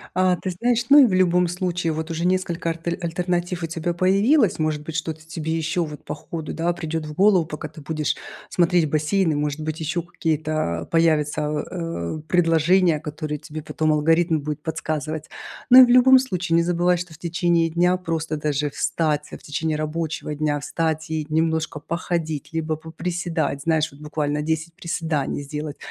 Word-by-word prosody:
А 185 -1 +3
ты 185 - -5
знаешь, 235 +6 0
ну 285 - +8
и 270 - +9
в 195 - -1
любом 180 -1 +3
случае 175 -2 -1
вот 160 +2 -4
уже 165 +1 -2
несколько 180 -2 0
артель 165 +1 -3
альтернатив 175 +1 -2
у 165 - -1
тебя 165 +1 -2
появилось. 195 - +3
Может 155 -1 -1
быть, 160 0 -7
что-то 160 -1 -4
тебе 160 0 -3
еще 165 +1 0
вот 150 -1 -9
по - - -4
ходу, 160 -3 -6
да, 170 +1 0
придет 160 -2 -4
в 150 - -7
голову, 190 -1 +4
пока 150 -1 -6
ты - - -13
будешь 155 0 -2 0.3
смотреть 175 -2 +2
бассейны. 155 +2 +1
Может 150 +1 -2
быть, 155 +1 -4
еще 165 +2 -1
какие-то, 155 - -2
а, - - -6
появятся, 155 -3 +2
а, 150 - -3
э, - - -10
предложения, 170 -1 +3
которые 150 0 -5
тебе 155 +1 -8
потом 155 0 0
алгоритм 165 +2 +2
будет 150 +1 -4
подсказывать. 155 -1 -4 0.4
Но 255 +1 +10
и 255 - +11
в - - -4
любом 255 +1 +7
случае 180 -9 0
не 170 - +4
забывай, 175 +1 +2
что 175 -1 -6
в 155 - -13
течение 170 -1 +1
дня 175 +2 +2
просто 165 -3 -3
даже 150 -1 -1
встать, 150 0 -1
а, - - -7
в - - -23
течение 155 +1 -2
рабочего 155 0 -3
дня, 145 -1 0
встать 160 +1 -2
и 155 -1 -2
немножко 160 -1 0
походить, 165 -2 -3
либо 160 -1 -1
поприседать, 165 -2 -3
знаешь, 160 0 +1
вот 145 - -16
буквально 150 -1 -2
10 160 +2 -2
приседаний 160 -5 -2
сделать, 150 +1 -6
160 Hz, 185 wpm, -23 LUFS, 155-175 Hz, 0.4 s, и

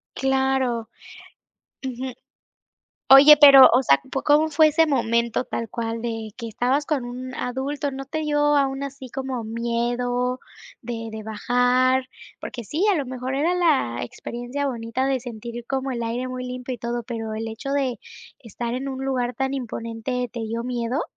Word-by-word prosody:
Claro. 265 -3 0 1.0
Ujú. 260 0 -4 1.0
Oye, 285 +3 +10
pero 275 -3 +10
o 250 +3 +4
sea, 140 - +4
p, - - -19 0.2
¿cómo 300 +2 +4
fue 310 0 +5
ese 320 +2 +3
momento 235 -4 +1
tal 230 - -4
cual, 230 +1 -4
de 225 -2 -4
que 230 -2 -6
estabas 250 +6 0
con 290 -6 -1
un 250 +1 -7
adulto, 275 +3 -3
no 270 0 -6
te 315 +3 -3
dio 295 -1 +2
aún 270 -1 0
así 275 -1 -7
como 260 -3 -4
miedo 240 +2 -1 0.4
de 230 -1 -5
de 220 0 -6
bajar? 250 +4 +1 0.3
Porque 240 - -7
sí, 320 - -1
a - - +3
lo 295 -5 -1
mejor 255 +1 -4
era 315 +6 +1
la 295 - +1
experiencia 245 - -5
bonita 235 0 -2
de 270 -1 0
sentir 235 0 -7
como 270 0 -2
el 240 -2 -3
aire 240 +3 -3
muy 255 0 -5
limpio 250 0 -5
y - - -10
todo, 235 +1 -3
pero 225 -2 -5
el 220 +1 -4
hecho 240 +5 -5
de 270 -4 0 0.4
estar 235 0 -6
en 265 +2 -3
un 265 0 -5
lugar 250 -2 -1
tan 265 +2 -1
imponente, 245 0 -4
¿te 235 - -5
dio 225 +1 -3
miedo? 245 +3 -2
250 Hz, 170 wpm, -23 LUFS, 235-270 Hz, 1.0 s, Oye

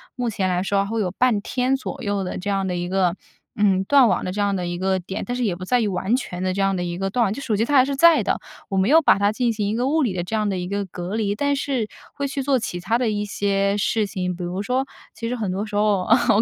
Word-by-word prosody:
目 245 -2 -1
前 195 -3 -1
来 180 0 0
说 195 0 +1
会 225 +3 -2
有 185 -4 0
半 240 +1 +2
天 255 +5 0
左 265 - -6
右 205 -1 -1
的 180 - -4
这 195 +3 -4
样 195 -1 0
的 180 - -2
一 175 0 -3
个， 185 -2 +1 0.4
嗯， 195 -2 +2
断 265 +4 +5
网 - - +1
的 185 - -2
这 205 - -5
样 200 -1 +1
的 180 -2 -2
一 175 0 -3
个 190 +1 0
点。 185 +2 -5
但 245 - -3
是 250 - -1
也 200 -6 0
不 185 +1 -7
在 245 +5 +2
于 220 - +1
完 195 +3 0
全 180 -8 -4
的 185 0 0
这 195 - -1
样 195 0 +2
的 180 - -2
一 175 0 -4
个 195 +1 -1
断， 225 -1 +1
就 280 - -7
手 230 -6 -1
机 225 - +2
它 290 - 0
还 260 - +7
是 280 0 -2
在 335 +4 +6
的， - - 0 0.3
我 195 - -1
没 190 +3 +2
有 320 +3 +7
把 295 - +5
它 200 0 +3
进 240 +2 0
行 210 -2 -2
一 210 - -1
个 245 +3 0
物 315 +3 +2
理 235 -9 +1
的 175 -1 -2
这 180 +6 -4
样 215 -1 +1
的 190 - -1
一 180 0 -3
个 200 +1 -2
隔 180 +2 -6
离。 205 -2 0
但 285 +5 +1
是 270 -5 -1 0.3
会 280 -1 -2
去 275 0 -3
做 270 0 +2
其 215 -7 -4
它 200 +6 0
的 245 -2 0
一 210 -1 -1
些 200 -1 0
事 215 +1 +1
情。 180 -2 -3
比 180 - -6
如 180 +3 -3
说 255 +4 0 0.3
其 230 +1 -5
实 245 - -2
很 215 -6 -2
多 195 +3 -2
时 210 - -7
候， 205 -2 +2
哦， - - -8 0.2
我 205 - +5
205 Hz, 335 characters per minute, -22 LUFS, 190-240 Hz, 0.4 s, 还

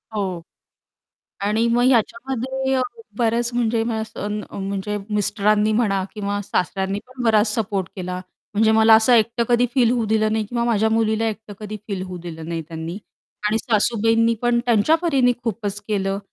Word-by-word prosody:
हो. 185 -4 -2 1.0
आणि 215 +3 +1
मग 240 +1 +2
याच्यामध्ये 265 +3 0
अ, 260 - +2 0.4
बऱ्याच 235 0 +1
म्हणजे 230 -1 +1
अ, - - -1 0.2
स 220 - -12
अ, - - -7
असं 210 -1 -5
म्हणजे 200 +1 -3
मिस्टरांनी 210 +1 +2
म्हणा 200 -4 +1
किंवा 205 -1 -2
सासऱ्यांनी 190 +2 -1
पण 255 -1 -7
बराच 220 -1 +4
सपोर्ट 200 -4 -1
केला, 180 -1 -4 0.3
म्हणजे 220 +1 +3
मला 220 0 +6
असं 225 +3 +4
एकटं 235 +1 +3
कधी 240 +1 +4
फील 245 -3 +4
होऊ 235 -3 0
दिलं 215 0 +1
नाही 220 -1 0
किंवा 235 +2 -2
माझ्या 220 -2 +2
मुलीला 220 0 +1
एकटं 215 -1 -8
कधी 215 0 -6
फील 195 -3 -3
होऊ 185 -1 -6
दिलं 160 -1 -7
नाही 165 -1 -3
त्यांनी 165 +3 -6 0.5
आणि 220 +1 +1
सासूबाईंनी 225 +1 +2
पण 240 0 +2
त्यांच्या 235 +7 +4
परीने 270 -7 +3
खूपच 210 -2 -3
केलं 195 -1 -1
220 Hz, 170 wpm, -22 LUFS, 205-235 Hz, 1.0 s, मला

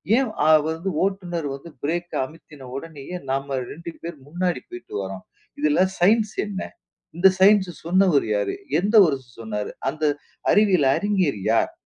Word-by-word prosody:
ஏன் 260 -2 +2 0.2
அவ 155 - +7 0.2
வந்து 165 +4 -3
ஓட்டுநர் 175 -5 -2
வந்து 155 +5 -11
ப்ரேக் 175 +3 -2
அமித்தின 150 -2 -13
உடனேயே 160 +3 -7
நாம 135 0 -1
2 170 +2 -7
பேர் 170 0 -5
முன்னாடி 175 +3 -1
போயிட்டு 360 0 -10
வர்றோம்? 95 -1 -7 0.3
இதில 300 0 +2 0.2
சயின்ஸ் 215 +3 +3
என்ன? 200 -2 -5 0.6
இந்த 175 +3 +6
சயின்ஸ் 195 -1 +5 0.2
சொன்னவர் 180 -4 +3
யாரு? 100 -1 -1 0.2
எந்த 205 +4 0
ஒருசு 130 -6 -3
சொன்னாரு? 105 -2 -4 0.2
அந்த 155 +3 -6 0.5
அறிவியல் 190 -9 +4
அறிஞர் 190 - 0
யார்? - - +2
170 Hz, 140 wpm, -23 LUFS, 140-195 Hz, 0.6 s, அவ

